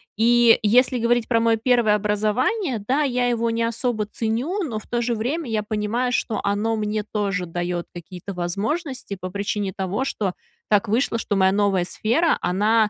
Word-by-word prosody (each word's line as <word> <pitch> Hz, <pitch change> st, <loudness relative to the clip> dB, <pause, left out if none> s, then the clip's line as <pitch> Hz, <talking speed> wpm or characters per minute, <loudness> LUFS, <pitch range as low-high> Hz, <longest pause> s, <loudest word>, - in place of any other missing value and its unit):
И 235 Hz, +1 st, +5 dB
если 250 Hz, +4 st, +4 dB
говорить 235 Hz, 0 st, +1 dB
про 230 Hz, -2 st, +2 dB
мое 230 Hz, 0 st, +3 dB
1 230 Hz, -2 st, +3 dB
образование, 215 Hz, -, 0 dB
да, 270 Hz, +4 st, +2 dB
я 250 Hz, -4 st, +1 dB
его 235 Hz, -1 st, 0 dB
не 230 Hz, 0 st, 0 dB
особо 230 Hz, -1 st, -1 dB
ценю. 235 Hz, -, -2 dB
Но 235 Hz, -9 st, -3 dB
в -, -, -17 dB
то 240 Hz, 0 st, -1 dB
же 240 Hz, 0 st, 0 dB
время 255 Hz, +6 st, -2 dB
я 215 Hz, -1 st, 0 dB
понимаю, 220 Hz, +4 st, -1 dB
что 225 Hz, -3 st, -1 dB
оно 210 Hz, +3 st, 0 dB
мне 210 Hz, 0 st, -1 dB
тоже 200 Hz, -3 st, -2 dB
дает 175 Hz, 0 st, -3 dB
какие-то 180 Hz, +3 st, -8 dB
возможности 205 Hz, -, -3 dB
по 185 Hz, 0 st, -5 dB
причине 200 Hz, 0 st, -2 dB
того, 195 Hz, +7 st, -2 dB
что 205 Hz, -7 st, -2 dB, 0.4 s
так 210 Hz, +1 st, +3 dB
вышло, 230 Hz, +2 st, +1 dB
что 205 Hz, -, -2 dB
моя 190 Hz, -1 st, +4 dB
новая 200 Hz, -2 st, +2 dB
сфера, 240 Hz, -, +1 dB
она, 210 Hz, +4 st, +2 dB
220 Hz, 175 wpm, -23 LUFS, 205-240 Hz, 0.4 s, И